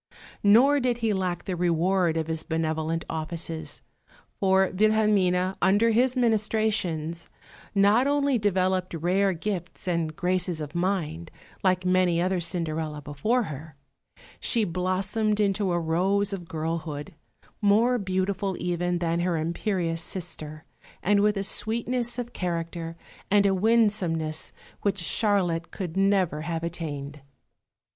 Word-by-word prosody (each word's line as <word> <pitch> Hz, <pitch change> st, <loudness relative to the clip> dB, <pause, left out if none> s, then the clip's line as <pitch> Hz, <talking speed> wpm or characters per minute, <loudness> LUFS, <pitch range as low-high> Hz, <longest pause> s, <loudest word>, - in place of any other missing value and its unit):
Nor 250 Hz, +8 st, +6 dB
did 250 Hz, -2 st, 0 dB
he 225 Hz, -3 st, 0 dB
lack 185 Hz, -3 st, -2 dB
the 185 Hz, -, -2 dB
reward 175 Hz, 0 st, +1 dB
of 160 Hz, -, 0 dB
his 160 Hz, 0 st, -3 dB
benevolent 160 Hz, 0 st, -2 dB
offices; 160 Hz, 0 st, -4 dB, 0.6 s
for 190 Hz, -1 st, +3 dB
Wilhelmine, 200 Hz, -3 st, +3 dB
under 205 Hz, +5 st, +4 dB
his 250 Hz, +3 st, +2 dB
ministrations, 210 Hz, -8 st, 0 dB, 0.5 s
not 205 Hz, +6 st, +4 dB
only 285 Hz, -3 st, +2 dB
developed 185 Hz, -3 st, 0 dB
rare 185 Hz, +4 st, +2 dB
gifts 180 Hz, 0 st, -5 dB
and 165 Hz, -3 st, -1 dB
graces 180 Hz, -1 st, 0 dB
of 150 Hz, -1 st, -6 dB
mind, 170 Hz, -3 st, -2 dB, 0.3 s
like 185 Hz, -1 st, +2 dB
many 180 Hz, -2 st, +3 dB
another 185 Hz, +1 st, +1 dB
Cinderella 160 Hz, -3 st, -2 dB
before 150 Hz, -, 0 dB
her; 155 Hz, -3 st, -8 dB, 0.6 s
she 230 Hz, -3 st, +1 dB
blossomed 190 Hz, +4 st, 0 dB
into 200 Hz, -2 st, +1 dB
a 175 Hz, -, +1 dB
rose 190 Hz, +5 st, +1 dB
of 175 Hz, -3 st, -6 dB
girlhood, 160 Hz, 0 st, -4 dB, 0.5 s
more 225 Hz, +4 st, +3 dB
beautiful 190 Hz, 0 st, -1 dB
even 175 Hz, 0 st, -1 dB
than 170 Hz, -1 st, 0 dB
her 175 Hz, -1 st, 0 dB
imperious 165 Hz, +1 st, -1 dB
sister, 160 Hz, -4 st, -6 dB, 0.4 s
and 205 Hz, +2 st, +3 dB
with 210 Hz, 0 st, +2 dB
a 195 Hz, -, -1 dB
sweetness 235 Hz, +4 st, 0 dB
of 245 Hz, -1 st, -5 dB
character 165 Hz, -1 st, -4 dB, 0.3 s
and 205 Hz, 0 st, +4 dB
a 195 Hz, -, +4 dB
winsomeness 190 Hz, -7 st, +1 dB, 0.3 s
which 200 Hz, -1 st, 0 dB
Charlotte 180 Hz, -3 st, +1 dB
could 180 Hz, -4 st, -6 dB
never 195 Hz, -5 st, +2 dB
have 165 Hz, 0 st, -3 dB
attained. 150 Hz, -4 st, -5 dB
185 Hz, 125 wpm, -26 LUFS, 165-205 Hz, 0.6 s, Nor